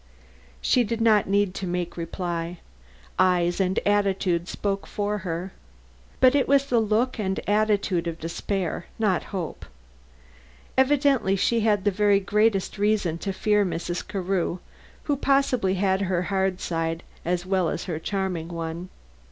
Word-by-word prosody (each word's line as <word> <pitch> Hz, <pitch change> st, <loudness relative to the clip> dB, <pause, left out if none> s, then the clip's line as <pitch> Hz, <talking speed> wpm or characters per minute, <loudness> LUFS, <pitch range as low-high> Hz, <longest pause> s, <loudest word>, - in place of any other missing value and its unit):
She 250 Hz, -, +3 dB
did 230 Hz, +1 st, -3 dB
not 215 Hz, -4 st, +4 dB
need 200 Hz, -1 st, +2 dB
to 190 Hz, -, -4 dB
make 175 Hz, -1 st, -3 dB
reply; 170 Hz, 0 st, -4 dB, 0.6 s
eyes 175 Hz, -1 st, +3 dB
and 190 Hz, 0 st, +1 dB
attitude 195 Hz, -4 st, +1 dB
spoke 195 Hz, 0 st, -3 dB
for 210 Hz, 0 st, -2 dB
her. 180 Hz, 0 st, -4 dB, 0.7 s
But 255 Hz, -1 st, +6 dB
it 280 Hz, -2 st, +2 dB
was 275 Hz, 0 st, +4 dB
the 245 Hz, -4 st, +2 dB
look 225 Hz, +3 st, +1 dB
and 190 Hz, -2 st, -1 dB
attitude 205 Hz, -4 st, +1 dB
of 165 Hz, -1 st, -3 dB
despair, 175 Hz, +2 st, -3 dB
not 200 Hz, -6 st, +1 dB
hope. 180 Hz, -5 st, -5 dB, 1.1 s
Evidently 265 Hz, -6 st, +3 dB
she 230 Hz, +4 st, +2 dB
had 210 Hz, -3 st, +2 dB
the 205 Hz, -, +3 dB
very 205 Hz, 0 st, +3 dB
greatest 210 Hz, 0 st, +1 dB
reason 200 Hz, -6 st, +1 dB
to 195 Hz, -, -3 dB
fear 210 Hz, +2 st, +2 dB
Mrs. 175 Hz, -1 st, -3 dB
Carew, 185 Hz, -2 st, -1 dB, 0.5 s
who 290 Hz, -, 0 dB
possibly 265 Hz, -8 st, +2 dB
had 190 Hz, 0 st, +1 dB
her 185 Hz, -2 st, 0 dB
hard 190 Hz, -1 st, 0 dB
side 165 Hz, 0 st, -2 dB, 0.2 s
as 175 Hz, +1 st, -1 dB
well 185 Hz, -3 st, +1 dB
as 170 Hz, -, -3 dB
her 165 Hz, -4 st, -4 dB
charming 185 Hz, -2 st, -2 dB
one. 170 Hz, +1 st, -5 dB
195 Hz, 145 wpm, -25 LUFS, 175-210 Hz, 1.1 s, But